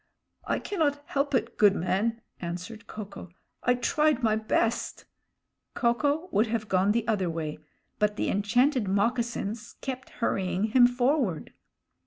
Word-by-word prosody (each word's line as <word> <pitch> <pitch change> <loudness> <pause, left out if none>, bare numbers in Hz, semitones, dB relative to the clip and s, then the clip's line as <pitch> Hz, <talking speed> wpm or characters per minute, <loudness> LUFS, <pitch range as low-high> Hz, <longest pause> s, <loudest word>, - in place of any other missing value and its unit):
"I - - 0
cannot 290 -7 -1
help 280 -1 0
it, - - -1
good 205 -2 +6
man," 210 +6 0 0.2
answered 180 +5 -6
Ko 215 -1 -6
ko. 195 -2 -11 0.3
"I 245 - +3
tried 300 +1 +1
my 215 -1 +3
best 220 +1 -1 0.3
" - - -55
Ko 235 -1 +3
ko 295 +7 0
would 215 +3 +3
have 220 -1 -2
gone 190 +1 +3
the 230 0 0
other 200 -6 +1
way, 155 -2 -4 0.4
but 210 -1 +2
the - - -1
enchanted 245 +4 +2
moccasins 230 +1 -1
kept 260 -1 -5
hurrying 190 -4 0
him 245 -2 +8
forward. 245 - 0
230 Hz, 150 wpm, -28 LUFS, 200-250 Hz, 0.4 s, him